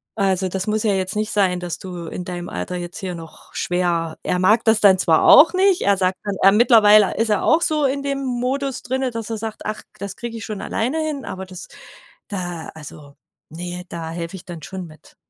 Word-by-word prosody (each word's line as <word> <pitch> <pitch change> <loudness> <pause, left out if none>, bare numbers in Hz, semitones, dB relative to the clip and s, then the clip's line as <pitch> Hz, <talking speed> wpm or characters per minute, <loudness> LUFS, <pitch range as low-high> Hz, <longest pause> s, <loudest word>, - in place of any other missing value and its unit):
Also, 190 -2 +1
das 190 +1 -3
muss 215 0 0
ja 210 -2 +2
jetzt 190 +2 -2
nicht 215 0 -1
sein, 185 -3 +2
dass 175 -3 -4
du 175 -3 -8
in 180 - -6
deinem 175 -1 -6
Alter 180 - -4
jetzt 175 -1 -6
hier 190 -4 -4
noch 165 -1 -13
schwer“ 175 -2 -1
er 180 - 0
mag 215 +5 +3
das 220 -1 +4
dann 195 -2 +6
zwar 165 -3 +3
auch 330 - +8
nicht, 380 0 +3
er 200 0 +4
sagt, 185 0 0 0.2
er 195 - +7
mittlerweile 215 -2 +6
ist 225 0 +1
er 210 - +1
auch 320 +2 +4
so 305 -3 +1
in 275 +1 0
dem 275 -1 -3
Modus 260 +2 -2
drinnen, 260 0 -2
dass 230 -1 -5
er 225 - -3
sagt: 220 0 -6
„Ach, 215 - -4 0.2
das 200 -2 -6
kriege 235 -1 -6
ich 220 - -7
schon 215 -2 -5
alleine 250 +8 -2
hin“, 290 -3 -4
aber 190 0 -6
das 185 -1 -10 0.6
da 175 -4 -5
also 145 -2 -11 0.4
ne, 175 +2 -6
da 165 -1 -6
helfe 170 +2 -5
ich - - -14
dann 170 -3 -8
schon 185 +1 -6
mit, 155 0 -18
195 Hz, 220 wpm, -21 LUFS, 180-230 Hz, 0.6 s, auch